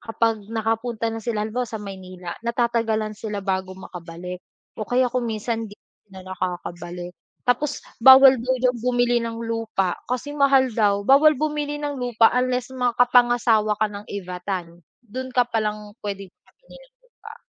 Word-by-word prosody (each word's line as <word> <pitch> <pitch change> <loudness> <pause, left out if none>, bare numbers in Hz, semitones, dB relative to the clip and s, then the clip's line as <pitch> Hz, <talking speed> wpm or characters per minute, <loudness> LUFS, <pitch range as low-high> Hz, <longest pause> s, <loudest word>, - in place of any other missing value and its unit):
kapag 225 -1 0
nakapunta 225 +1 -1
na 225 0 -5
sila 220 -1 -2
halimbawa 245 +3 -2
sa 220 -1 -6
Maynila 185 -3 -8
natatagalan 230 -2 0
sila 210 -1 -4
bago 190 -1 -1
makabalik, 180 -1 -8 0.4
o 215 - -2
kaya 250 +1 +2
kung 250 -1 0
minsan 225 +1 -2
'di 205 - -13 0.3
sila 190 -1 -12
nakakabalik. 175 -1 -5 0.3
Tapos 270 +4 0 0.2
bawal 265 +1 +9
daw 255 +2 0
diyan 250 0 +1
bumili 245 0 +2
ng 230 0 -4
lupa, 225 -5 -1
kasi 255 +4 -3
mahal 275 -3 +3
daw. 205 -2 +1
Bawal 290 +5 +6
bumili 295 0 -2
ng 290 -1 -4
lupa 235 -2 +3
unless 250 0 0
makapangasawa 240 -3 +3
ka 215 - +2
ng 205 0 -8
Ivatan, 180 -2 -5 0.2
dun 255 +4 -6
ka 250 -1 +2
pa 230 -2 -1
lang 210 -1 -4
puwede 200 -1 -5
bumili - - -20
ng - - -18 0.3
lupa. 445 +1 -10
225 Hz, 155 wpm, -23 LUFS, 200-250 Hz, 0.4 s, bawal